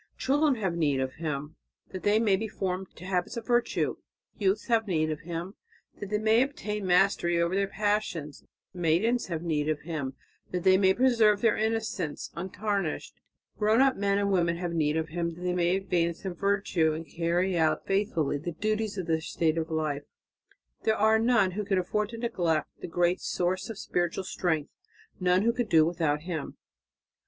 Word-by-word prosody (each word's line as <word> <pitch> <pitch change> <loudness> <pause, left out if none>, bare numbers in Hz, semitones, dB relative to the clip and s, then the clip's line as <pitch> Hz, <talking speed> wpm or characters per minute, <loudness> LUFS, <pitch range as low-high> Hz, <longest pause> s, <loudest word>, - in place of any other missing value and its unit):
Children 290 +1 +2
have 195 -6 -1
need 145 -5 +1
of 130 0 -2
Him 150 0 -4 0.3
that 185 - -6
they 205 +1 +3
may 215 -4 +3
be 220 +3 -3
formed 190 -2 -3
to 180 - -11
habits 185 +4 -1
of 230 - -5
virtue; 240 -1 +1 0.4
youths 200 +1 0
have 225 -2 +1
need 155 -4 +1
of 155 - -4
Him 170 +3 -5 0.5
that 205 - -6
they 210 - +1
may 220 +2 +4
obtain 210 -7 -2
mastery 175 -2 +3
over 170 +1 +1
their 195 0 +1
passions; 205 -8 -2 0.3
maidens 180 +8 +1
have 170 -2 -4
need 155 -3 0
of 155 -1 -1
Him 145 -5 -4 0.3
that 180 -1 -3
they 190 0 +6
may 190 0 +4
preserve 230 -5 +4
their 230 -2 +4
innocence 220 -8 -2
untarnished; 190 -1 -3 0.5
grown 215 +2 +3
up 270 0 +4
men 200 0 +1
and 200 0 +1
women 170 -3 +2
have 175 -1 -3
need 155 -1 +1
of 160 0 -2
Him 170 0 -2
that 175 - -12
they 180 0 0
may 175 0 +2
advance 175 -2 -1
in 190 - -2
virtue 195 -4 +1
and 160 +1 -5
carry 175 +2 0
out 160 -2 +1
faithfully 195 -8 0
the 170 +3 -5
duties 215 +3 -1
of 185 - -3
their 160 -1 0
state 160 0 0
of 165 0 -2
life; 155 -3 -1 0.8
there 220 0 +1
are 220 +1 +4
none 225 -5 +3
who 210 +3 -3
can 195 -1 0
afford 210 +3 0
to 230 - -7
neglect 175 - 0
the - - -6
great 175 +1 +1
source 185 +3 -1
of 225 - -6
spiritual 175 0 -1
strength, 160 -5 -1 0.5
none 180 +1 +3
who 235 +1 +3
can 245 -1 -1
do 160 -5 +5
without 160 -3 0
Him." 160 -3 -5
185 Hz, 185 wpm, -28 LUFS, 165-210 Hz, 0.8 s, they